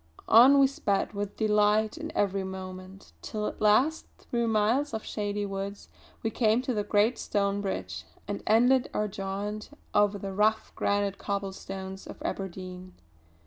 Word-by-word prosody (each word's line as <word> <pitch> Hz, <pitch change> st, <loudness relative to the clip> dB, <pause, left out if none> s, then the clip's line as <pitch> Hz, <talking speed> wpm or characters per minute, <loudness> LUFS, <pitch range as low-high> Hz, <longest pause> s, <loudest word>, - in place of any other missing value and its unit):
On 255 Hz, +5 st, +8 dB
we 275 Hz, -, +7 dB
sped 215 Hz, -7 st, -1 dB
with 205 Hz, 0 st, -4 dB
delight 210 Hz, +1 st, +3 dB
in 320 Hz, 0 st, -6 dB
every 195 Hz, -1 st, +1 dB
moment, 190 Hz, 0 st, -8 dB
till 210 Hz, -1 st, -4 dB
at -, -, -5 dB
last 250 Hz, +10 st, +3 dB
through 235 Hz, -1 st, -2 dB
miles 225 Hz, +5 st, +1 dB
of 220 Hz, -, -5 dB
shady 205 Hz, -1 st, -2 dB
woods 195 Hz, 0 st, -5 dB, 0.3 s
we 225 Hz, -, 0 dB
came 225 Hz, +1 st, +2 dB
to 255 Hz, -, -1 dB
the 210 Hz, -2 st, 0 dB
great 210 Hz, +3 st, +2 dB
stone 200 Hz, -1 st, 0 dB
bridge, 90 Hz, -, -4 dB, 0.2 s
and 205 Hz, 0 st, -3 dB
ended 245 Hz, +4 st, +4 dB
our 210 Hz, -, +1 dB
jaunt 200 Hz, +1 st, -4 dB, 0.2 s
over 205 Hz, 0 st, +3 dB
the 195 Hz, 0 st, -5 dB
rough 215 Hz, +2 st, +1 dB
granite 200 Hz, -1 st, 0 dB
cobblestones 195 Hz, -1 st, -5 dB
of -, -, -9 dB
Aberdeen. 185 Hz, -1 st, -6 dB
205 Hz, 150 wpm, -28 LUFS, 195-220 Hz, 0.3 s, On